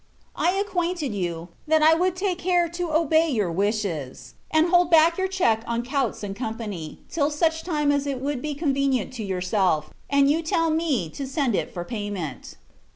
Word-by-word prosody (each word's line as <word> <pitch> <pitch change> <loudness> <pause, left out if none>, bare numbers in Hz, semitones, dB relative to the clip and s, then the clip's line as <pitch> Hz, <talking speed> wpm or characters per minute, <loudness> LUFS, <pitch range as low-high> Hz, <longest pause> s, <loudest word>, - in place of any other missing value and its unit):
I 350 - +2
acquainted 355 - -1
you, 175 -3 -3 0.2
that 315 0 +3
I 315 +1 +7
would 360 +2 +1
take 370 -1 -1
care 350 -1 +2
to 345 0 -4
obey 320 +1 +3
your 210 - 0
wishes, 165 - -2 0.2
and 315 +2 +3
hold 355 -1 +4
back 335 +1 +5
your 380 - +1
check 235 -13 +1
on 235 0 -1
Coutts 260 -5 -1
and 195 -1 -4
Co. 225 -1 -4 0.5
till 295 -3 0
such 320 +2 0
time 300 -4 0
as 285 0 0
it 275 -2 -2
would 275 -1 -2
be 300 0 -3
quite 295 - -8
convenient 270 - +1
to 235 -4 -5
yourself, 180 -5 0 0.2
and 280 0 +4
you 305 +3 +2
tell 330 0 +1
me 310 - 0
to 275 - -5
send 270 -3 0
it - - -1
for 175 -1 -5
payment. 205 - -5
280 Hz, 190 wpm, -24 LUFS, 210-330 Hz, 0.5 s, I